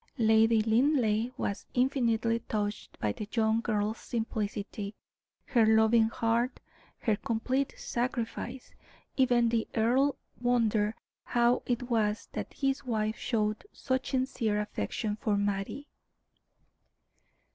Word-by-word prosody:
Lady 225 -1 +4
Linleigh 230 -1 +2
was 200 - -3
infinitely 235 -3 +2
touched 210 -1 -3
by 105 - 0
the 210 - -6
young 225 -1 +2
girl's 215 0 -1
simplicity, 210 -2 -4 0.5
her 240 -5 +3
loving 220 +1 +5
heart, 230 +2 0 0.4
her 220 -4 +1
complete 255 +4 -1
sacrifice. 245 +1 -3 0.4
Even 245 -3 +3
the 225 -1 0
earl 250 +5 +3 0.3
wondered 225 -3 +2 0.3
how 240 0 +2
it 245 0 0
was 220 -3 0
that - - -5
his 270 -1 -1
wife 220 -3 -1
showed 215 -3 -1
such 260 0 -2
sincere 255 -5 0
affection 210 - -3
for 210 -1 0
Mattie. 205 +8 -2
225 Hz, 110 wpm, -30 LUFS, 215-245 Hz, 0.5 s, loving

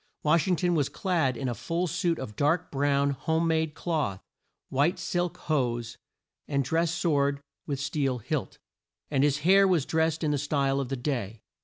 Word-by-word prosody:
Wash 155 +4 +3
ing 185 - +3
ton 175 +2 +1
was 145 -5 +1
clad 160 -10 0
in 135 - -3
a 120 - -1
full 170 +8 -2
suit 170 0 0
of 105 -5 -7
dark 160 - +1
brown 140 0 +2
home 160 +4 0
made 160 -1 0
cloth, 150 - -1 0.5
white 145 +8 +2
silk 175 -2 -2
hose, 120 -7 -1 0.5
and 140 -1 +1
dress 165 +5 +1
sword 145 -4 +1 0.3
with 140 -2 -2
steel 140 -2 -1
hilt, 115 - -3 0.5
and 135 -2 +2
his 145 0 +2
hair 195 +2 +6
was 170 -7 +2
drest 160 0 0
in 150 - +1
the 145 - 0
style 140 -1 0
of 135 -3 -3
the 135 - -2
day. 120 -5 -3
150 Hz, 180 wpm, -28 LUFS, 135-165 Hz, 0.5 s, hair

